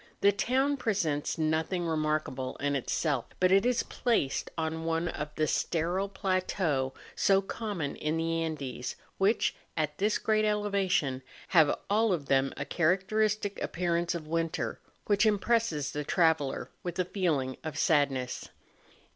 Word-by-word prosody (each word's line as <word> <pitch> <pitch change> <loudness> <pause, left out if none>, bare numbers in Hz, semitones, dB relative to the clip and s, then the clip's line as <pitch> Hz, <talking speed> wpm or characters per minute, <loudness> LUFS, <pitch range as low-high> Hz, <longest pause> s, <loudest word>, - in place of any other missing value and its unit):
The 200 - +6
town 265 +7 +1
presents 175 - 0
nothing 160 +3 0
remarkable 155 -5 -1
in 145 0 -1
itself; 140 0 0
hut 185 0 +4
it 195 +5 +5
is 250 -1 +2
placed 225 - 0
on 160 0 -2
one 165 +1 0
of 150 -2 -4
the 155 - +2
sterile 175 +6 0
plateaux 185 -8 0 0.2
so 195 -1 +4
common 195 -6 -4
in 155 +1 -1
the 165 0 0
Andes, 140 -6 -4 0.2
which, 200 +4 +2 0.2
at 150 -1 -1
this 210 +2 +2
great 215 -1 +1
elevation, 195 -9 +1 0.3
have 160 -5 +5
all 215 +1 +3
of 155 -5 -2
them 135 0 +2
a - - -3
chamcteristic 200 +4 +1
appearance 170 0 0
of 165 -2 -5
winter, 165 -6 -2 0.3
which 205 +2 +3
impresses 205 - +1
the 150 - -3
traveller 160 -4 +1
with 175 -1 -5
a 185 - +1
feeling 155 -9 -1
of 155 -1 -5
sadness. 140 -5 +1
165 Hz, 140 wpm, -30 LUFS, 150-195 Hz, 0.3 s, The